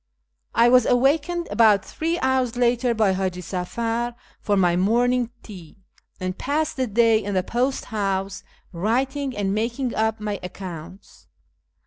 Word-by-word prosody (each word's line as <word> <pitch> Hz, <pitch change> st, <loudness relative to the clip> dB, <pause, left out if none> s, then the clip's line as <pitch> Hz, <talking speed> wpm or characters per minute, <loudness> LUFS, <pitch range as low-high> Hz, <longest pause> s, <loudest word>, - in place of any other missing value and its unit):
I 230 Hz, +1 st, +5 dB
was 250 Hz, -1 st, +5 dB
awakened 300 Hz, +7 st, +2 dB
about 210 Hz, -2 st, +4 dB
three 330 Hz, +2 st, -2 dB
hours 260 Hz, -2 st, +1 dB
later 240 Hz, 0 st, +2 dB
by 215 Hz, -3 st, +3 dB
Hiiji 185 Hz, -1 st, -2 dB
Safar 230 Hz, +7 st, -3 dB, 0.2 s
for 205 Hz, -1 st, 0 dB
my 175 Hz, -2 st, +3 dB
morning 240 Hz, +5 st, +2 dB
tea, 180 Hz, -7 st, -12 dB, 0.4 s
and 185 Hz, -1 st, -3 dB
passed 305 Hz, +6 st, -1 dB
the 260 Hz, -1 st, -1 dB
day 225 Hz, 0 st, +3 dB
in 200 Hz, 0 st, -3 dB
the 185 Hz, -, +1 dB
post 255 Hz, +6 st, -1 dB
house 195 Hz, -3 st, -2 dB, 0.3 s
writing 260 Hz, +8 st, -1 dB
and 195 Hz, -1 st, 0 dB
making 235 Hz, +4 st, -2 dB
up 220 Hz, 0 st, 0 dB
my 210 Hz, -2 st, -3 dB
accounts. 180 Hz, 0 st, -9 dB
225 Hz, 140 wpm, -23 LUFS, 195-250 Hz, 0.4 s, I